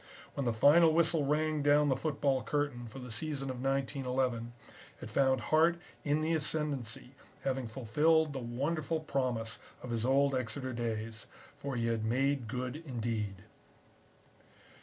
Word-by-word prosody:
When 140 Hz, -3 st, -2 dB
the -, -, +3 dB
final 150 Hz, +9 st, +6 dB
whistle 160 Hz, -3 st, +3 dB
rang 155 Hz, +1 st, +1 dB
down 145 Hz, 0 st, +4 dB
the 135 Hz, -, +3 dB
football 140 Hz, -2 st, 0 dB
curtain 120 Hz, 0 st, -2 dB
for 110 Hz, -, -10 dB
the 125 Hz, -2 st, -8 dB
season 135 Hz, +2 st, -2 dB
of 125 Hz, -1 st, -6 dB
1911 130 Hz, -3 st, -1 dB, 0.5 s
it -, -, -8 dB
found 130 Hz, -2 st, +3 dB
Hart 160 Hz, +8 st, +3 dB, 0.3 s
in 150 Hz, +1 st, +1 dB
the 160 Hz, +1 st, +1 dB
ascendancy 145 Hz, -6 st, -1 dB, 0.3 s
having 130 Hz, -2 st, -1 dB
fulfilled 150 Hz, +7 st, +2 dB
the 135 Hz, -, -3 dB
wonderful 145 Hz, +7 st, -1 dB
promise 125 Hz, -7 st, -2 dB, 0.2 s
of 125 Hz, -, -5 dB
his 115 Hz, -1 st, 0 dB
old 135 Hz, +2 st, +3 dB
Exeter 130 Hz, +1 st, -2 dB
days. 115 Hz, -1 st, -4 dB, 0.3 s
For 140 Hz, -2 st, -4 dB
he 115 Hz, -1 st, 0 dB
had 115 Hz, -1 st, 0 dB
made 130 Hz, +2 st, +1 dB
good 125 Hz, +3 st, -3 dB
indeed. 115 Hz, -, -3 dB
135 Hz, 145 wpm, -32 LUFS, 120-150 Hz, 0.5 s, final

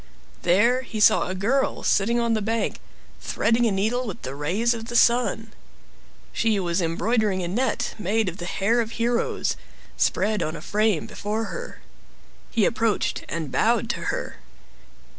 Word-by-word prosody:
There 220 Hz, +9 st, +3 dB
he 230 Hz, -4 st, -6 dB
saw 215 Hz, +1 st, +5 dB
a 185 Hz, -, -3 dB
girl 240 Hz, +9 st, 0 dB
sitting 235 Hz, +4 st, +2 dB
on 235 Hz, -1 st, +1 dB
the 215 Hz, -, 0 dB
bank, 225 Hz, +2 st, -1 dB, 0.4 s
threading 235 Hz, +1 st, +1 dB
a -, -, +1 dB
needle 220 Hz, +6 st, 0 dB
with 200 Hz, -, -7 dB
the 130 Hz, -, -5 dB
rays 185 Hz, +12 st, 0 dB
of 225 Hz, -1 st, -6 dB
the 240 Hz, 0 st, -6 dB
sun. 235 Hz, -2 st, +3 dB, 0.8 s
She 220 Hz, -3 st, +1 dB
was 175 Hz, 0 st, 0 dB
embroidering 195 Hz, +3 st, 0 dB
a -, -, -2 dB
net 230 Hz, +6 st, -1 dB
made 210 Hz, +2 st, 0 dB
of 180 Hz, 0 st, -4 dB
the 175 Hz, -, -6 dB
hair 225 Hz, +7 st, +1 dB
of 225 Hz, 0 st, -5 dB
heroes, 235 Hz, +1 st, 0 dB, 0.4 s
spread 215 Hz, 0 st, +1 dB
on 155 Hz, +1 st, -2 dB
a -, -, -8 dB
frame 210 Hz, -5 st, +1 dB
before 215 Hz, +2 st, -3 dB
her. -, -, -7 dB, 0.7 s
He 225 Hz, -4 st, +2 dB
approached 225 Hz, -2 st, 0 dB
and 160 Hz, -5 st, -4 dB
bowed -, -, +2 dB
to -, -, -6 dB
her. -, -, -3 dB
220 Hz, 160 wpm, -24 LUFS, 190-235 Hz, 0.8 s, saw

